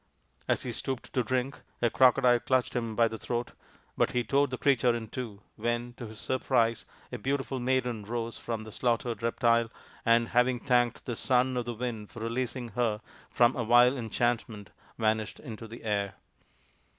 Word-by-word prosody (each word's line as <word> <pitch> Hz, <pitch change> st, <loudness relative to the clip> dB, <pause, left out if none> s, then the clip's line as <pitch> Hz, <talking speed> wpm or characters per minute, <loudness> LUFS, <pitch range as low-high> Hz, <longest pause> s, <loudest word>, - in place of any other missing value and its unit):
As -, -, +1 dB
he 125 Hz, -, -3 dB
stooped 130 Hz, +2 st, -4 dB
to 130 Hz, -, +2 dB
drink 130 Hz, +4 st, -2 dB, 0.2 s
a 120 Hz, -1 st, +2 dB
crocodile 125 Hz, -1 st, +5 dB
clutched 130 Hz, -2 st, 0 dB
him 115 Hz, -3 st, -2 dB
by 115 Hz, 0 st, +4 dB
the 110 Hz, -1 st, -6 dB
throat, 120 Hz, 0 st, -3 dB, 0.4 s
but -, -, +1 dB
he 125 Hz, -, +1 dB
tore 140 Hz, +5 st, +2 dB
the 130 Hz, -1 st, -4 dB
creature 125 Hz, -4 st, +3 dB
in 110 Hz, -2 st, -5 dB
two, 110 Hz, -5 st, -6 dB, 0.2 s
when, 120 Hz, +2 st, -2 dB
to 120 Hz, -1 st, -8 dB
his 110 Hz, 0 st, -10 dB
surprise, 120 Hz, -3 st, +1 dB, 0.3 s
a 125 Hz, -, -5 dB
beautiful 135 Hz, +2 st, -2 dB
maiden 125 Hz, -3 st, 0 dB
rose 115 Hz, +1 st, -3 dB
from 115 Hz, -2 st, -4 dB
the 110 Hz, -, -10 dB
slaughtered 115 Hz, -1 st, -1 dB
reptile, 115 Hz, 0 st, +2 dB, 0.3 s
and, 115 Hz, 0 st, +3 dB
having 125 Hz, +1 st, +3 dB
thanked 120 Hz, -1 st, +1 dB
the 120 Hz, -, -3 dB
Son 130 Hz, +2 st, +2 dB
of 125 Hz, -1 st, -1 dB
the 120 Hz, -1 st, -4 dB
Wind 115 Hz, -3 st, -4 dB
for 115 Hz, -, -10 dB
releasing 120 Hz, +1 st, -3 dB
her 110 Hz, -1 st, 0 dB, 0.3 s
from 120 Hz, +1 st, +4 dB
a 120 Hz, -, -1 dB
vile 120 Hz, +3 st, +6 dB
enchant 120 Hz, 0 st, 0 dB
ment, 105 Hz, -3 st, -10 dB, 0.3 s
vanished 110 Hz, -1 st, 0 dB
into 115 Hz, -4 st, -8 dB
the 115 Hz, +2 st, -10 dB
air. 100 Hz, -2 st, -1 dB
120 Hz, 180 wpm, -29 LUFS, 115-125 Hz, 0.4 s, vile